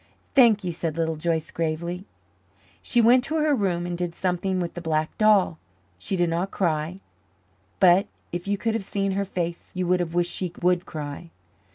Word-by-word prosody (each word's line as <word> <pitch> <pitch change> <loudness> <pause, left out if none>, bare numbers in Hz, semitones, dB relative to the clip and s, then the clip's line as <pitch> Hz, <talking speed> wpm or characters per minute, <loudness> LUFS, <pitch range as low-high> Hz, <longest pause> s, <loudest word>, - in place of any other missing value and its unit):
"Thank 230 -6 +6
you," 180 - -2
said 165 -1 -3
Little 160 -1 0
Joyce 160 0 -1
gravely. 170 +3 -3 0.8
She 240 - +2
went 245 +2 +6
to 315 - -3
her 305 -1 +3
room 185 -8 0
and 175 0 -3
did 175 -1 -3
something 185 +1 -1
with 175 -2 -3
the 175 - -6
black 155 -1 -1
doll. 210 -6 +4 0.4
She 185 - -3
did 175 -1 +2
not 175 +4 -1
cry, 170 0 -1 0.8
but 185 0 +5 0.2
if 175 +2 -4
you 200 0 +1
could 225 +2 -1
have 225 - -2
seen 195 0 -1
her 200 +1 -1
face 175 -2 -4
you 185 0 -1
would 180 +1 +2
have 170 -1 -3
wished 175 0 +2
she 180 -3 -3
would 180 0 +1
cry. 150 +2 -6
175 Hz, 190 wpm, -25 LUFS, 170-195 Hz, 0.8 s, Thank